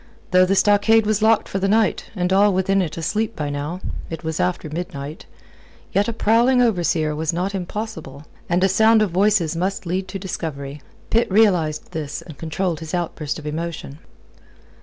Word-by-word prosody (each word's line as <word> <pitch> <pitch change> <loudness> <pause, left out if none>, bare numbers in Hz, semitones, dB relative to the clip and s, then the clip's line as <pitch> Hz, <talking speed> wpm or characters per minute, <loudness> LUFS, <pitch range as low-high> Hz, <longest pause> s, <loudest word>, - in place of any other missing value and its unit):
Though 185 0 +5
the 195 - +2
stockade 210 +2 +4
was 215 0 +1
locked 220 0 +3
for 195 - -3
the 195 - 0
night, 215 0 +1
and 180 -1 0
all 200 +2 +5
within 195 +1 +2
it 170 -3 -4
asleep 215 +7 -1
by 145 -2 -3
now 150 +6 -4 0.3
it 165 0 -6
was 160 -1 -3
after 180 -3 -1
midnight 155 -2 -6 0.6
yet 200 +1 +2
a - - 0
prowling 230 +3 +3
overseer 170 -9 +1
was 155 0 -1
not 180 +4 -2
impossible, 175 -7 -6 0.2
and 175 +2 +2
a - - +6
sound 220 +3 +4
of 200 - -2
voices 185 -3 +2
must 185 +3 -2
lead 185 +2 -2
to 190 +1 -5
discovery. 150 -7 -5 0.3
Pitt 230 +1 +2
realized 180 -8 +2
this, 155 -4 -5
and 160 - -11
controlled 165 +1 -2
his 160 +2 -4
outburst 160 -4 -3
of 155 - -10
emotion. 155 -2 -5
180 Hz, 180 wpm, -21 LUFS, 160-205 Hz, 0.6 s, a